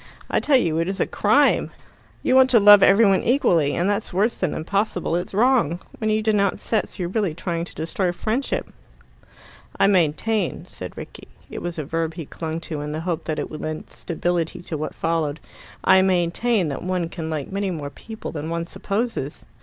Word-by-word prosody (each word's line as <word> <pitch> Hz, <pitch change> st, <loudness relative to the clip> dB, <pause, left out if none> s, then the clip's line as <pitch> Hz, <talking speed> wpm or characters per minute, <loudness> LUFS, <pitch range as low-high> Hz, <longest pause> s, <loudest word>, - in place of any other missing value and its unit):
I -, -, +3 dB
tell 285 Hz, -3 st, +4 dB
you 165 Hz, -9 st, +1 dB
it 165 Hz, -, 0 dB
is 195 Hz, +1 st, -3 dB
a -, -, +3 dB
crime. -, -, +3 dB, 0.5 s
You -, -, +2 dB
want 260 Hz, 0 st, +6 dB
to 240 Hz, -3 st, +6 dB
love 205 Hz, 0 st, +9 dB
every 200 Hz, +4 st, +6 dB
one 195 Hz, -2 st, +4 dB
equally, 175 Hz, -, +2 dB
and 175 Hz, -, +1 dB
that's 205 Hz, +1 st, -1 dB
worse 205 Hz, +6 st, +1 dB
than 185 Hz, -5 st, -1 dB
impossible 185 Hz, 0 st, -1 dB
it's 175 Hz, +1 st, -3 dB
wrong. 225 Hz, -, +3 dB, 0.2 s
When 220 Hz, -, 0 dB
you 215 Hz, 0 st, +1 dB
denounce 205 Hz, -3 st, +1 dB
sets, 220 Hz, -, -1 dB
you're 180 Hz, -3 st, -2 dB
really 195 Hz, -5 st, -1 dB
trying 170 Hz, -1 st, -3 dB
to -, -, -13 dB
destroy 175 Hz, +3 st, -1 dB
friendship." 225 Hz, +9 st, -2 dB, 1.1 s
"I -, -, +5 dB
maintain," 195 Hz, +2 st, +1 dB
said -, -, -9 dB
Rickie -, -, -9 dB, 0.2 s
it -, -, -6 dB
was 175 Hz, -1 st, -4 dB
a 155 Hz, -, -3 dB
verb 165 Hz, +1 st, -2 dB
he 165 Hz, -3 st, -6 dB
clung 160 Hz, +2 st, -5 dB
to, 155 Hz, -3 st, -5 dB
in 150 Hz, 0 st, -4 dB
the 155 Hz, -, -3 dB
hope 170 Hz, -1 st, -3 dB
that 155 Hz, -2 st, -2 dB
it -, -, -4 dB
would 155 Hz, -, -7 dB
lend 155 Hz, 0 st, -5 dB
stability 175 Hz, +1 st, -2 dB
to 165 Hz, -, -5 dB
what 155 Hz, +1 st, -4 dB
followed 165 Hz, -2 st, -1 dB, 0.4 s
"I 190 Hz, -, +6 dB
maintain 185 Hz, +2 st, +1 dB
that 140 Hz, -, -4 dB
one 180 Hz, -2 st, -1 dB
can 165 Hz, -1 st, -6 dB
like 155 Hz, -1 st, -4 dB
many 200 Hz, 0 st, -1 dB
more 150 Hz, -5 st, -5 dB
people 220 Hz, +9 st, -8 dB
than 155 Hz, 0 st, -5 dB
one 170 Hz, 0 st, -2 dB
supposes." 200 Hz, -, -3 dB
175 Hz, 200 wpm, -23 LUFS, 160-205 Hz, 1.1 s, love